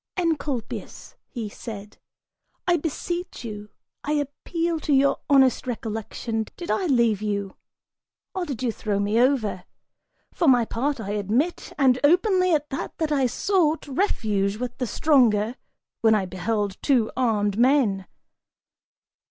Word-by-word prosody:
"Encolpius," 300 Hz, -9 st, -3 dB, 0.4 s
said 210 Hz, -3 st, -8 dB
he, 355 Hz, -, -7 dB
"I -, -, +5 dB
beseech 345 Hz, 0 st, -4 dB
you, 210 Hz, -2 st, -7 dB, 0.3 s
I 295 Hz, -, -1 dB
appeal 325 Hz, +3 st, -2 dB
to 305 Hz, -, -3 dB
your 275 Hz, 0 st, +4 dB
honest 265 Hz, -3 st, +4 dB
recollection, 225 Hz, -1 st, -3 dB
did 345 Hz, -, -4 dB
I 380 Hz, -, 0 dB
leave 235 Hz, -, +2 dB
you, 200 Hz, -2 st, -2 dB, 0.8 s
or 370 Hz, -2 st, -2 dB
did 270 Hz, -6 st, -5 dB
you 240 Hz, -, +1 dB
throw 210 Hz, -2 st, -2 dB
me 205 Hz, +3 st, +1 dB
over? 240 Hz, -8 st, +1 dB, 0.7 s
For 335 Hz, -, +1 dB
my 245 Hz, -3 st, +5 dB
part, 270 Hz, +5 st, -2 dB
I 205 Hz, -2 st, -4 dB
admit, 215 Hz, -, -1 dB
and 260 Hz, -3 st, +4 dB
openly 365 Hz, +4 st, +4 dB
at 300 Hz, -2 st, 0 dB
that, 270 Hz, -, -5 dB
that 315 Hz, -2 st, -1 dB
I 275 Hz, -3 st, +3 dB
sought, 320 Hz, -, +1 dB
refuge 215 Hz, -, 0 dB
with 245 Hz, +1 st, -4 dB
the 250 Hz, -, -1 dB
stronger, 235 Hz, -6 st, +3 dB, 0.5 s
when 220 Hz, -1 st, +5 dB
I 200 Hz, -3 st, 0 dB
beheld 200 Hz, +2 st, -2 dB
two 245 Hz, -6 st, +2 dB
armed 215 Hz, -5 st, +1 dB
men." 240 Hz, -7 st, +3 dB
250 Hz, 135 wpm, -24 LUFS, 215-295 Hz, 0.8 s, I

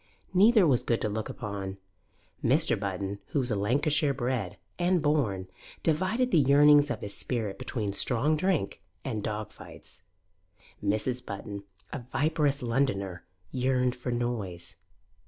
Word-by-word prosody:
Neither 210 Hz, +2 st, +6 dB
was 130 Hz, -6 st, +3 dB
good 115 Hz, -, 0 dB
to 110 Hz, -, 0 dB
look 110 Hz, +1 st, -3 dB
upon. 100 Hz, -2 st, -5 dB, 0.7 s
Mr. 150 Hz, +7 st, +4 dB
Button, 100 Hz, 0 st, -3 dB
who -, -, 0 dB
was 125 Hz, -1 st, -2 dB
Lancashire 140 Hz, +8 st, +2 dB
bred 120 Hz, -7 st, -2 dB, 0.2 s
and 175 Hz, +1 st, +3 dB
born, 135 Hz, -, 0 dB, 0.4 s
divided 185 Hz, +11 st, +1 dB
the 170 Hz, -, +5 dB
yearnings 145 Hz, +1 st, +6 dB
of -, -, -3 dB
his 100 Hz, -, -1 dB
spirit 110 Hz, -6 st, -2 dB
between 110 Hz, -5 st, -3 dB
strong 130 Hz, +8 st, +1 dB
drink 185 Hz, +1 st, 0 dB, 0.2 s
and 115 Hz, -6 st, -2 dB
dog 105 Hz, 0 st, -4 dB
fights. -, -, -13 dB, 0.8 s
Mrs. 110 Hz, +5 st, 0 dB
Button, 100 Hz, -2 st, -7 dB, 0.3 s
a 150 Hz, -, -3 dB
viperous 145 Hz, +2 st, 0 dB
Londoner, 100 Hz, -8 st, -1 dB, 0.3 s
yearned 125 Hz, -1 st, +1 dB
for 125 Hz, 0 st, -4 dB
noise. 105 Hz, -8 st, -3 dB
125 Hz, 135 wpm, -29 LUFS, 105-145 Hz, 0.8 s, Neither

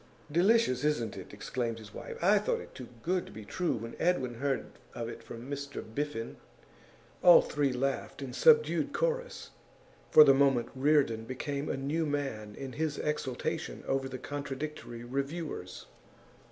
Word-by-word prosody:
'Delicious, 180 Hz, -, +3 dB
isn't 135 Hz, -8 st, 0 dB
it?' -, -, -9 dB
exclaimed 120 Hz, -3 st, -3 dB
his 110 Hz, -2 st, -12 dB
wife. -, -, -7 dB
'I 205 Hz, +3 st, +6 dB
thought 210 Hz, -, 0 dB
it -, -, -11 dB
too 125 Hz, -, -8 dB, 0.2 s
good 180 Hz, +1 st, 0 dB
to -, -, -11 dB
be 110 Hz, -1 st, -9 dB
true 180 Hz, -, -1 dB
when 115 Hz, +1 st, -6 dB
Edwin 135 Hz, -9 st, +1 dB
heard 140 Hz, -1 st, 0 dB, 0.3 s
of 115 Hz, -1 st, -3 dB
it 115 Hz, -, -7 dB
from 115 Hz, +2 st, -9 dB
Mr 140 Hz, 0 st, -5 dB
Biffen.' 115 Hz, 0 st, -4 dB, 0.8 s
All 175 Hz, -1 st, +9 dB
three 145 Hz, -2 st, 0 dB
laughed 135 Hz, +2 st, -2 dB
in 130 Hz, -2 st, -6 dB
subdued 465 Hz, -1 st, +4 dB
chorus. -, -, -2 dB, 0.6 s
For 155 Hz, -, +10 dB
the 135 Hz, -, +7 dB
moment, 135 Hz, -3 st, +3 dB
Reardon 135 Hz, -5 st, +2 dB
became 140 Hz, +4 st, -3 dB
a -, -, -1 dB
new 150 Hz, +4 st, -1 dB
man 135 Hz, -8 st, -3 dB
in 135 Hz, -1 st, -6 dB
his 155 Hz, -1 st, -1 dB
exultation 145 Hz, -4 st, -3 dB
over 135 Hz, 0 st, 0 dB
the 130 Hz, -, -5 dB
contradictory 140 Hz, -3 st, -5 dB
reviewers. 140 Hz, -, -4 dB
140 Hz, 155 wpm, -31 LUFS, 120-150 Hz, 0.8 s, For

